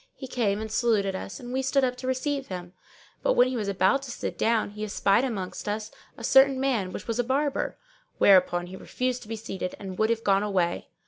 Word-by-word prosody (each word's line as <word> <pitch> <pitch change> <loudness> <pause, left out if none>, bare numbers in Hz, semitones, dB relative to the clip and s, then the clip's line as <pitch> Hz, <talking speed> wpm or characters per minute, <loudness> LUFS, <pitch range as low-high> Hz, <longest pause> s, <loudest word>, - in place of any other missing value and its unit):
He 265 - -8
came 220 -6 0
and 220 0 -5
saluted 215 -5 +1
us 195 +4 -6
and 245 -1 -7
we 265 - +1
stood 265 +1 +2
up 250 -1 +1
to 255 0 -6
receive 270 +1 -1
him; 180 -1 -7 0.5
but - - +2
when 250 - +5
he 255 - -3
was 215 -4 -2
about 195 +7 +2
to 275 - -8
sit - - -4
down 225 -2 +1
he 210 +1 -6
espied 210 +2 +2
amongst 205 -6 -4
us 215 +1 -3 0.3
a - - -10
certain 270 0 +5
man 240 -9 0
which - - -7
was 230 0 -2
a - - +3
Barber; 275 +3 -1 0.4
whereupon 180 -2 +5
he 180 +1 -9
refused 250 +5 -3
to 215 - -12
be 225 - -4
seated 195 -4 -5
and 190 -2 -8
would 220 0 +3
have 230 0 0
gone 195 -1 +3
away. 185 -4 0
225 Hz, 230 wpm, -27 LUFS, 195-255 Hz, 0.5 s, when